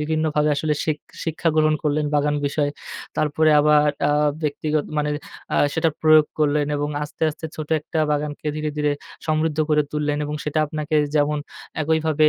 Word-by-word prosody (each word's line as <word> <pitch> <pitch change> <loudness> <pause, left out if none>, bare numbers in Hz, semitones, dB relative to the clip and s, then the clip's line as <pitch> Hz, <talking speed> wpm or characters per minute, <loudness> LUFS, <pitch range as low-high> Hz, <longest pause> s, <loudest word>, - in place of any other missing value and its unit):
বিভিন্নভাবে 150 -1 +1
আসলে 150 +1 0
শিখ 155 -2 0 0.3
শিক্ষা 165 +1 -1
গ্রহণ 155 0 +4
করলেন, 150 0 +1
বাগান 145 0 +2
বিষয়ে। 145 0 0 0.5
তারপরে 155 +1 +2
আবার 150 0 +4 0.2
আ - - +2 0.3
ব্যক্তিগত 150 0 -1
মানে 150 0 0 0.4
আ - - +2 0.2
সেটা 165 0 +2
প্রয়োগ 155 -1 +6
করলেন 150 -1 +2
এবং 145 0 -1 0.2
আস্তে, 150 - -10
আস্তে 155 +1 -7
ছোট 155 -1 -5
একটা 155 +2 -4
বাগানকে 150 +1 -3
ধীরে, 155 0 -2
ধীরে 150 -1 +1 0.3
সমৃদ্ধ 155 0 0
করে 150 0 +4
তুললেন 150 -1 0
এবং 150 +1 -4
সেটা 150 +1 -1
আপনাকে 155 +1 -3 0.2
যেমন 150 0 +2 0.4
একইভাবে 155 0 +3
150 Hz, 160 wpm, -22 LUFS, 150-155 Hz, 0.5 s, প্রয়োগ